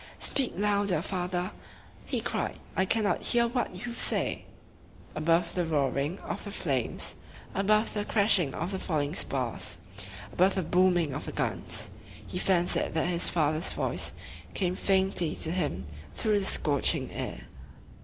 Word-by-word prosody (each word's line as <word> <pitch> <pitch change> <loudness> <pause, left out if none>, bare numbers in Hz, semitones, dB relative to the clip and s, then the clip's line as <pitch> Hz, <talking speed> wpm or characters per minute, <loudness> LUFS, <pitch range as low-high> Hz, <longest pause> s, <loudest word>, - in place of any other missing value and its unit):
"Speak 270 -3 0
louder, 200 -4 +1
father!" 180 -1 -2 0.6
he - - -1
cried. - - -2 0.2
"I 190 - +2
cannot 210 +1 +2
hear 235 -1 +3
what 245 0 -2
you 240 - -4
say." - - +3 0.7
Above 165 +2 +2
the 180 - 0
roaring 145 +1 0
of - - -5
the 205 - -6
flames, 140 - -1 0.4
above 210 +3 +2
the 210 - -1
crashing 200 - +4
of 175 - -3
the 190 - -3
falling 150 -5 -1
spars, 125 - -1 0.6
above 185 +2 +3
the 190 - 0
booming 175 -3 +3
of - - -4
the - - -5
guns, - - -1 0.3
he 180 - -4
fancied 175 -3 +2
that 160 +2 +1
his 170 -1 +1
father's 155 0 +1
voice - - -1 0.4
came 180 -2 +1
faintly 190 -5 +1
to 160 - -1
him 175 -5 -1 0.3
through 215 -2 +2
the 195 - -1
scorching 145 -6 +2
air. - - -4
180 Hz, 145 wpm, -29 LUFS, 155-200 Hz, 0.7 s, crashing